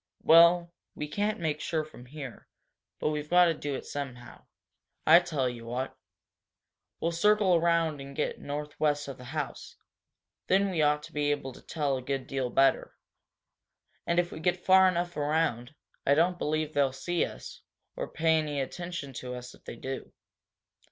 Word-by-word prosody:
Well, 170 +1 +6 0.2
we 150 - -4
can't 210 +7 -1
make 155 -2 -2
sure 160 -2 -1
from 125 -5 -14
here, 135 -3 -9 0.5
but - - 0
we've 150 0 -4
got 180 0 +6
to 165 - +3
do 145 -2 -4
it - - -6
somehow. 130 -4 -7 0.6
I 170 - +9
tell 155 -7 -1
you 120 -2 -6
what. 125 +3 -3 1.0
We'll 165 - 0
circle 205 +2 +3
around 165 -3 +2
and 140 0 -9
get - - -2
northwest 150 0 -2
of 135 -2 -7
the 125 - -10
house. 145 +3 -5 0.7
Then 195 +1 +3
we 165 -4 0
ought 150 0 +2
to - - -11
be 145 0 0
able 140 -3 -2
to - - -14
tell 145 -4 -1
a - - -5
good 135 0 -3
deal 130 -2 -2
better. 135 +1 +2 1.1
And 170 - +1
if 175 0 +2
we - - -7
get 180 +2 -1
far 190 0 +7
enough 175 -1 -1
around, 150 -3 0 0.3
I 140 - +4
don't 175 +3 +2
believe 155 0 -1
they'll 140 -2 +2
see 170 +6 -1
us, - - -7 0.3
or - - -4
pay 160 0 +2
any 150 -2 -2
attention 170 0 -5
to 125 0 -5
us 125 0 -8
if - - -20
they - - -7
do." 135 0 -6
150 Hz, 175 wpm, -29 LUFS, 135-170 Hz, 1.1 s, I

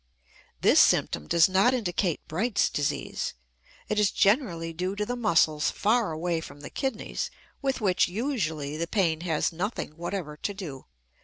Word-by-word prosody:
This - - +6
symptom 75 - +3
does 170 -2 +5
not 195 +7 +3
indicate 180 -6 -1
Bright's 205 +7 +1
disease. 145 -1 -2 0.5
It 210 - 0
is 210 -2 +4
generally 190 - +1
due 180 +4 -2
to 210 +1 -1
the 245 - -2
muscles 165 -9 +2
far 220 -2 +1
away 165 +1 -1
from 145 -2 -11
the - - -9
kidneys, 265 -5 -3 0.3
with 270 -2 -1
which, 190 -3 +3
usually, 175 - -2
the 170 +1 -2
pain 165 -5 +1
has 165 -2 0
nothing 195 +7 -3
whatever 170 -3 -4
to 205 - -3
do. 155 -10 -7
180 Hz, 155 wpm, -27 LUFS, 160-210 Hz, 0.5 s, This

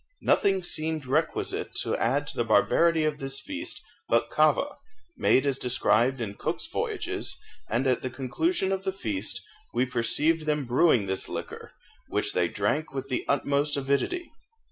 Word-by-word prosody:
Nothing 195 -2 +3
seemed 155 -3 -1
requisite 150 +5 -1
to - - -1
add 135 +6 +1
to - - -6
the 120 - +1
barbarity 160 +8 +3
of 150 -1 -1
this 135 0 -3
feast 295 +3 -5 0.3
but - - +2
kava, - - +2 0.4
made 130 - +3
as 135 -2 0
described 125 +1 +2
in 110 -4 -3
Cook's - - -3
voyages, - - -3 0.3
and 120 +4 0
at 130 -2 +2
the 130 - -3
conclusion 190 - -1
of 195 0 -1
the 190 -1 -1
feast 290 +9 -3 0.3
we 130 - +3
perceived 145 +7 +1
them 150 -2 +1
brewing 125 -3 +3
this 95 0 -2
liquor, - - -7 0.3
which - - -1
they 90 -1 +2
drank 105 - -1
with 135 0 -4
the 125 - -1
utmost 140 +1 +1
avidity. 140 - -1
140 Hz, 160 wpm, -27 LUFS, 125-160 Hz, 0.4 s, Nothing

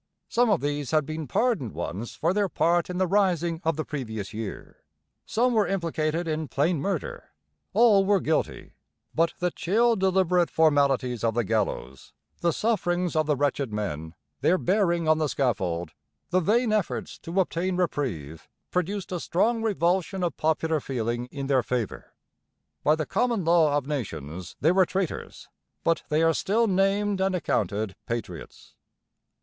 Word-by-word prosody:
Some 240 0 +3
of 200 -5 +2
these 145 -1 -2
had 155 -2 +2
been 155 0 -5
pardoned 200 - 0
once 90 +7 -5
for 170 +3 +1
their 200 -1 +1
part 170 +1 +1
in 180 - -3
the 185 - +2
rising 175 -4 +1
of 165 -1 +1
the 155 - -3
previous 110 -9 -5
year; 110 -1 -7 0.5
some 245 +2 +2
were 215 -3 +3
implicated 165 -3 -1
in 155 -1 -2
plain 155 +4 +1
murder; 200 +4 -3 0.4
all 220 -4 +5
were 200 0 +3
guilty; 160 -2 -2 0.4
but 165 +1 +1
the 180 0 0
chill 230 +9 +2
deliberate 185 -3 +2
formalities 140 -6 +2
of 115 -1 +1
the 120 - +2
gallows, 95 - -2 0.3
the 170 - +2
sufferings 180 -5 0
of 155 -1 +2
the 150 - +2
wretched 140 -3 0
men, 85 -6 -4 0.2
their 185 - +3
bearing 175 -4 +1
on 155 0 +4
the 155 - +1
scaffold, 90 - -1 0.4
the 185 - +4
vain 220 +5 +2
efforts 210 -5 -2
to 170 +4 -2
obtain 185 0 0
reprieve, 115 - -3 0.2
produced 190 +2 -2
a 180 - -2
strong 225 +8 +1
revulsion 190 -3 0
of 170 -4 -1
popular 160 0 +1
feeling 120 -2 -3
in 140 +1 -6
their 135 -2 +3
favour. 120 -3 -3 0.7
By 150 - +4
the 155 -1 -2
common 235 - 0
law 160 -3 +4
of 145 - -2
nations 90 - -5
they 160 - +4
were 185 -1 +4
traitors; 190 -4 -4 0.4
but 165 -1 +2
they 155 +2 +2
are 165 0 +4
still 220 +8 +1
named 195 0 +1
and 190 -1 +1
accounted 105 - -1
'patriots.' 110 -8 -6
165 Hz, 160 wpm, -26 LUFS, 130-190 Hz, 0.7 s, all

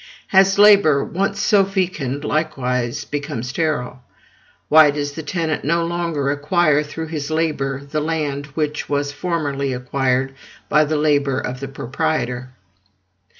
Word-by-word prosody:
Has 195 0 +4
labor, 200 -9 +6
once 195 +2 -2
so 205 -1 +4
fecund, 175 -8 -2
likewise 125 -6 -1
become 145 -4 -4
sterile? 130 -2 -2 0.7
Why 155 -1 +7
does 145 0 -2
the 155 +3 -6
tenant 160 -1 -2
no 170 +3 +1
longer 165 -5 -1
acquire 150 +1 +2
through 160 +2 -6
his 150 -3 -4
labor 145 -4 -1
the 150 +2 -2
land 150 -3 -2
which 150 -1 -2
was 145 0 -1
formerly 145 -4 -2
acquired 130 +1 -1 0.4
by 150 +1 +4
the 155 +1 -1
labor 145 -3 +1
of 125 -1 -5
the 135 - -5
proprietor? 130 -2 -3
150 Hz, 135 wpm, -20 LUFS, 140-165 Hz, 0.7 s, Why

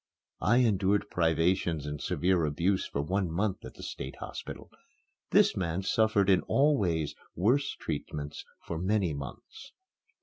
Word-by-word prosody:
I 115 +5 +4
endured 100 -4 +2
privations 80 -1 +1
and 75 0 -5
severe 90 0 +1
abuse 85 +6 +1
for 70 - -2
one 95 +3 0
month 95 +4 -1
at - - -9
the - - -10
State 65 - -6
Hospital. - - -8 0.6
This - - +4
man 90 0 -1
suffered 105 -1 +2
in 95 -2 +5
all 145 +2 +4
ways 80 - 0 0.2
worse 125 - +2
treatment 75 -1 -4 0.3
for 85 - -4
many 95 -2 +1
months. 70 - -9
90 Hz, 140 wpm, -30 LUFS, 80-100 Hz, 0.6 s, in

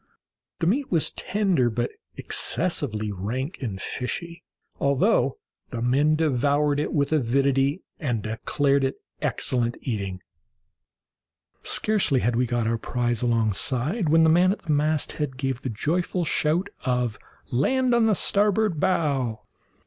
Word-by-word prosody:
The 165 - -1
meat 260 +10 +1
was 165 -4 +1
tender, 185 - +1
but 120 +1 -2 0.2
excessively 105 0 0
rank 120 - -4
and 105 -7 -4
fishy, 170 - -5 0.4
although 140 - +2 0.3
the 115 -2 -4
men 140 +5 +3
devoured 145 -1 +1
it 150 - -1
with 145 0 0
avidity, 135 +3 +1 0.2
and 120 - -2
declared 135 +6 0
it 135 - 0 0.3
excellent 120 -1 0
eating. 100 -6 -4 1.4
Scarcely 195 - +2
had 120 +2 +1
we 125 +1 +1
got 120 -1 -1
our 115 0 0
prize 120 -1 -1
alongside, 125 - 0
when 160 +1 +5
the 160 - +5
man 180 +3 +4
at 205 - -5
the 160 - -2
masthead 150 -2 0
gave 130 -2 -2
the 130 - -3
joyful 175 - -1
shout 160 +5 +1
of 125 -4 -1 0.3
"land 250 - +2
on 235 -2 +4
the 215 - +3
starboard 205 -3 +2
bow!" 140 - 0
140 Hz, 135 wpm, -25 LUFS, 120-165 Hz, 1.4 s, when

